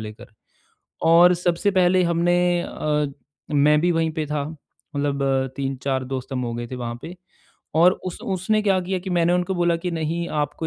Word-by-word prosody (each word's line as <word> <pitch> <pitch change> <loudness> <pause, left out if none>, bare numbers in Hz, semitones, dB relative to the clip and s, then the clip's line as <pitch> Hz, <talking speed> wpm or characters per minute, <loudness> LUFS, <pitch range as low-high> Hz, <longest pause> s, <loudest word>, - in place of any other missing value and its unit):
लेकर। 110 0 -9 0.8
और 170 +2 +6
सबसे 175 +3 0
पहले 185 -1 +3
हमने 170 +1 +2 0.3
अ, 150 -2 -1 0.5
मैं 150 +1 +4
भी 175 +1 +2
वहीं 165 -1 +1
पे 155 -1 -3
था, 150 -1 -2 0.5
मतलब 140 -1 -1 0.3
3-4 135 -1 -2
दोस्त 130 +1 -5
हम 125 -1 -2
हो 120 -1 -3
गए 120 0 -4
थे 130 - -6
वहाँ 120 -1 -4
पे, 175 +2 -8 0.6
और 175 +3 +6
उस-उसने 190 +3 -1
क्या 195 -2 +2
किया 185 +1 -2
कि 190 - -4
मैंने 175 0 +2
उनको 180 +1 0
बोला 175 -1 +2
कि 175 +2 -4
नहीं 165 +1 -2
आपको 160 +2 -4
165 Hz, 175 wpm, -23 LUFS, 140-180 Hz, 0.8 s, और